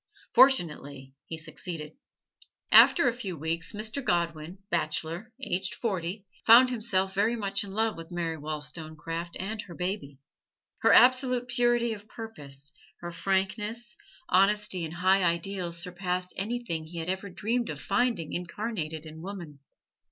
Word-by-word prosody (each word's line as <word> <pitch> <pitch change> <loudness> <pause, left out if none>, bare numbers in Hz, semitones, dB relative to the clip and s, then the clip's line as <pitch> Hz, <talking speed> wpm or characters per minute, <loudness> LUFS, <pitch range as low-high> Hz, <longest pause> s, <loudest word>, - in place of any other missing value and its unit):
Fortunately 145 - +3
he 160 - -5
succeeded. 160 0 -7 0.8
After 335 -7 +8
a 240 - +2
few 200 -8 -5
weeks, 160 +2 -3
Mr. 220 +6 -2
Godwin, 170 -1 -1
bachelor, 165 +5 -2
aged 190 +1 -2
forty, 195 -2 -3 0.2
found 245 +3 +8
himself 195 -5 0
very 210 +4 +2
much 200 -2 -1
in 200 - -8
love 220 0 0
with 165 0 -8
Mary 170 -2 -2
Wollstonecraft 155 +2 -5
and 215 +3 -3
her 175 -5 -11
baby. 180 -7 -3 0.6
Her - - +4
absolute 255 -1 +5
purity 240 -1 +2
of 210 0 -10
purpose, 145 - -9 0.3
her 175 0 -5
frankness, 210 +6 -1 0.3
honesty 195 -1 +2
and 160 +2 -7
high 190 +2 +4
ideals 170 0 -1
surpassed 180 +1 -3
anything 210 -5 -3
he 170 +1 -9
had 165 0 -3
ever 190 +2 -2
dreamed 230 +6 -1
of 150 -2 -5
finding 200 - 0
incarnated 175 -4 -4
in 160 0 -10
woman. 175 -6 -8
185 Hz, 135 wpm, -28 LUFS, 165-220 Hz, 0.8 s, After